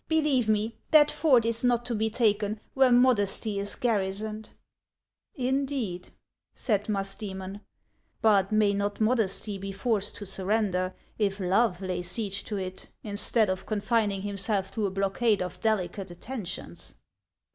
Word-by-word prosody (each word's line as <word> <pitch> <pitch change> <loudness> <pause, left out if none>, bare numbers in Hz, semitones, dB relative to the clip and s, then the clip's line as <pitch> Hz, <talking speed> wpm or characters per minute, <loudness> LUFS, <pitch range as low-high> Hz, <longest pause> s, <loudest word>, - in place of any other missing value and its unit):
Believe 295 -8 +2
me, 215 +1 +1 0.2
that 300 -1 +6
fort 260 -8 +4
is 230 +1 -1
not 240 -1 +2
to 245 - -2
be 220 0 +1
taken 215 -2 +1
where 265 -1 +4
Modesty 225 -4 +3
is 200 +1 -3
garrisoned." 215 -1 -2 0.5
" - - -55 0.2
Indeed! 265 -10 -2 0.2
" - - -63
said 210 -3 0
Musdcemon. 195 -1 -3 0.3
" - - -44
But 200 -3 +4
may 215 -1 +3
not 200 0 -2
Modesty 215 -3 +1
be 195 0 -5
forced 205 +1 -1
to 205 - -7
surrender, 190 -1 0 0.2
if 200 -1 0
Love 190 0 +1
lay 180 -1 -2
siege 200 +2 -2
to 210 - -3
it, 185 -1 -6 0.2
instead 210 +1 +1
of 185 0 -3
confining 210 -2 0
himself 200 -1 -1
to 215 -3 -1
a - - -2
blockade 195 +2 +1
of 180 - -7
delicate 195 -3 -1
attentions 195 +3 -7
205 Hz, 145 wpm, -28 LUFS, 195-230 Hz, 0.5 s, that